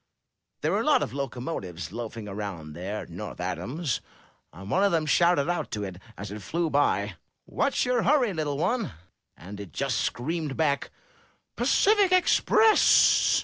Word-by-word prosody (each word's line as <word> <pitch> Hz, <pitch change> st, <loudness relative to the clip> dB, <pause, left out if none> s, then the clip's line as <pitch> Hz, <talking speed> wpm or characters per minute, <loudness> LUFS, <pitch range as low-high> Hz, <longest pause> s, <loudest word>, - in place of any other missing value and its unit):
There -, -, 0 dB
were -, -, +1 dB
a -, -, -2 dB
lot -, -, +3 dB
of -, -, -5 dB
locomotives 120 Hz, -, -5 dB
loafing 115 Hz, -1 st, -6 dB
around 95 Hz, -7 st, -6 dB
there 95 Hz, +6 st, -5 dB
at -, -, -14 dB
North -, -, -7 dB
Adams, 145 Hz, 0 st, -3 dB, 0.5 s
and 95 Hz, +4 st, -10 dB
one 190 Hz, -, +3 dB
of 200 Hz, -, +3 dB
them 160 Hz, -2 st, +1 dB
shouted 170 Hz, -1 st, +3 dB
out 175 Hz, 0 st, -2 dB
to 105 Hz, -1 st, -3 dB
it 95 Hz, -2 st, -6 dB, 0.2 s
as 100 Hz, 0 st, -7 dB
it 105 Hz, 0 st, -7 dB
flew 165 Hz, -, -2 dB
by, 105 Hz, -9 st, +1 dB, 0.3 s
What's -, -, 0 dB
your 250 Hz, -1 st, +1 dB
hurry, 255 Hz, -7 st, +2 dB
little 150 Hz, -4 st, -2 dB
one?* 200 Hz, -, -1 dB, 0.4 s
and 100 Hz, +3 st, -10 dB
it 100 Hz, -5 st, -8 dB
just -, -, -1 dB
screamed 150 Hz, +2 st, -2 dB
back, 145 Hz, -3 st, 0 dB, 0.7 s
Tacific 405 Hz, -2 st, +3 dB
Express! 420 Hz, +4 st, +5 dB
140 Hz, 160 wpm, -26 LUFS, -, 0.7 s, Express